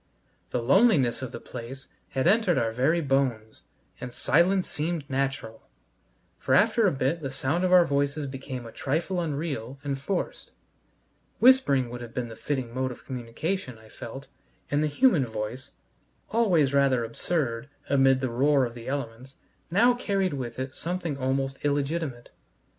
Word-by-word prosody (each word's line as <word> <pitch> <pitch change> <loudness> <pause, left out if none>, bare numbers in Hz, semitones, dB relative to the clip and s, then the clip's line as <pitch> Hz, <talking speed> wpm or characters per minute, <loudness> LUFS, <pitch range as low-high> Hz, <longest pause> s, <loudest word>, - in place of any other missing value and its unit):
The 120 - -2
loneliness 140 - +4
of 130 - -5
the - - -7
place 125 +4 -9 0.2
had 130 - -1
entered 195 -1 +4
our 115 -1 +1
very 140 +9 +2
bones, 130 -6 -1 0.4
and 125 - -6
silence 175 +9 +2
seemed 155 -1 -3
natural, 135 -5 -2 0.8
for - - +2
after 220 +1 +4
a - - +3
bit 135 +5 -1
the 135 - -3
sound 145 +7 -1
of 185 - +1
our 180 -1 +7
voices 140 +1 0
became 130 -2 -6
a 115 - -9
trifle 165 +9 -1
unreal 140 -6 -3
and 140 -2 -2
forced; 185 +5 -3 0.9
whispering 145 - +4
would 120 0 -6
have 120 -1 -9
been 125 -2 -2
the 115 - -9
fitting 130 -2 -3
mode 130 +1 -1
of 125 - -11
communication, 130 +4 -4
I 110 0 -17
felt, 135 +5 -9 0.5
and 145 +1 +2
the 155 - +2
human 155 - +3
voice, 110 +4 -5 0.6
always 180 - +3
rather 135 -4 +3
absurd 120 0 -2 0.2
amid 135 -1 +4
the 130 -3 -1
roar 135 +2 +3
of 120 - -6
the 120 -1 -10
elements, 130 -1 -5 0.3
now 230 +8 +5
carried 195 -7 -1
with 125 -4 -5
it 130 0 -4
something 175 -3 -3
almost 135 0 -2
illegitimate. 145 -2 -2
135 Hz, 160 wpm, -27 LUFS, 125-165 Hz, 0.9 s, our